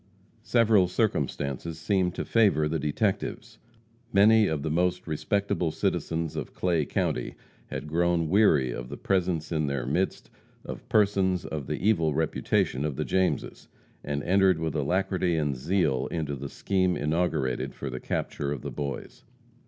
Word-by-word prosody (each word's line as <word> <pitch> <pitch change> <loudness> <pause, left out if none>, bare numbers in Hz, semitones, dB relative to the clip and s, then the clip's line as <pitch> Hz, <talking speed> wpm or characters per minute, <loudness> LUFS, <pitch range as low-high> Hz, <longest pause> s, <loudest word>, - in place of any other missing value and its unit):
Several 110 -5 +4
circumstances 85 - -1
seemed 90 +1 0
to - - -3
favor 100 -10 +3
the 80 +1 -1
detectives. 95 +8 -2 0.5
Many 105 +2 +6
of 75 -3 -2
the 80 - -1
most 90 +2 0
respectable 95 +3 -1
citizens 80 +1 -2
of - - -5
Clay 85 -5 +1
county - - -2 0.3
had - - -5
grown 85 +1 +1
weary 75 - +4
of 60 0 -6
the 70 - -6
presence 90 -4 0
in 75 -2 0
their 70 -3 -2
midst 85 +9 -1 0.3
of - - -8
persons 95 -3 +2
of 75 -4 -5
the 100 - -2
evil 80 -9 +2
reputation 75 -3 0
of 75 -3 -2
the 75 +2 -2
Jameses, 95 +7 -1 0.4
and 70 0 -3
entered 95 -1 +4
with 80 -1 -2
alacrity 90 +3 0
and 75 -3 0
zeal 75 -1 0
into 75 -4 -3
the 70 +1 -6
scheme 95 -2 0
inaugurated 75 -4 -1
for 70 - -5
the 65 - -5
capture 70 +2 -3
of 70 -4 -4
the - - -4
Boys. 70 -3 -6
80 Hz, 155 wpm, -27 LUFS, 75-95 Hz, 0.5 s, Many